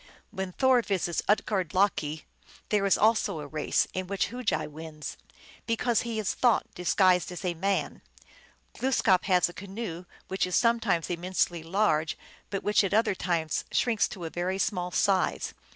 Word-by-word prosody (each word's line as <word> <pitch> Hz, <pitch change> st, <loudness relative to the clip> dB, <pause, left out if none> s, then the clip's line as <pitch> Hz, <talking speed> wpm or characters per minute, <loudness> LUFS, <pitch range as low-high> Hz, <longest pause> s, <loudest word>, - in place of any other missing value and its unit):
When 190 Hz, -3 st, -4 dB
Thor 260 Hz, +1 st, +4 dB
visits 185 Hz, -6 st, -1 dB
Utgard 195 Hz, -5 st, +1 dB
Loki, 160 Hz, -6 st, +1 dB, 0.4 s
there 205 Hz, -2 st, +2 dB
is 195 Hz, -, +4 dB
also 215 Hz, -6 st, +2 dB
a 150 Hz, -, -6 dB
race, 150 Hz, +1 st, 0 dB
in 185 Hz, 0 st, -3 dB
which 195 Hz, -1 st, -1 dB
Hugi 250 Hz, 0 st, -1 dB
wins, 155 Hz, 0 st, -8 dB, 0.5 s
because 230 Hz, 0 st, +1 dB
he 230 Hz, -2 st, -4 dB
is 215 Hz, -4 st, -1 dB
Thought 240 Hz, -3 st, +2 dB
disguised 180 Hz, 0 st, +2 dB
as 180 Hz, +2 st, -6 dB
a 180 Hz, -, 0 dB
man. 195 Hz, +4 st, -1 dB, 0.7 s
Glooskap 225 Hz, -8 st, +2 dB
has 180 Hz, -2 st, +3 dB
a 175 Hz, -, -10 dB
canoe, 195 Hz, -3 st, -6 dB, 0.2 s
which 190 Hz, -1 st, -1 dB
is 180 Hz, -, -1 dB
sometimes 230 Hz, -8 st, +2 dB
immensely 175 Hz, -1 st, -1 dB
large, 165 Hz, -3 st, +1 dB, 0.3 s
but 195 Hz, -, -3 dB
which 210 Hz, 0 st, +3 dB
at 195 Hz, +1 st, 0 dB
other 220 Hz, -2 st, +3 dB
times 170 Hz, -4 st, -1 dB
shrinks 230 Hz, -4 st, +2 dB
to 175 Hz, -3 st, -8 dB
a 160 Hz, -, -5 dB
very 180 Hz, +2 st, -2 dB
small 180 Hz, -3 st, -1 dB
size. 190 Hz, +1 st, +1 dB
190 Hz, 160 wpm, -28 LUFS, 175-210 Hz, 0.7 s, Thor